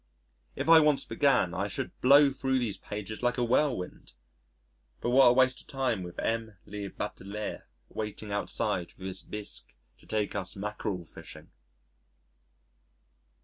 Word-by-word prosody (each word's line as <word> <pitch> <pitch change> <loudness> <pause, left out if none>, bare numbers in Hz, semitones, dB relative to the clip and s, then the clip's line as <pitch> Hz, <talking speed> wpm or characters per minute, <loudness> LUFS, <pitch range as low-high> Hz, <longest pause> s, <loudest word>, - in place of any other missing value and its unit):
If - - -3
I 165 0 +9
once 150 -2 +3
began 120 - +2
I - - -1
should - - -3
blow 140 +2 +7
thro' 135 0 -2
these 120 -6 0
pages 105 +1 -6
like 125 +1 +1
a 125 - +1
whirlwind.... 120 - 0 0.9
But 120 - -1
what 130 0 +7
a 120 - +7
waste 130 0 +3
of - - -22
time 130 -7 -1
with 90 -1 -8
M. 115 -2 -2
le 100 -1 -6
batelier 100 +3 -5 0.2
waiting 105 -1 -5
outside 95 -3 -1
with 95 - -9
his 95 0 -4
bisque 105 -1 -7 0.2
to - - -21
take 105 -1 -1
us 95 -2 -4
mackerel 100 -2 -4
fishing!... - - -12
110 Hz, 145 wpm, -29 LUFS, 100-130 Hz, 0.9 s, I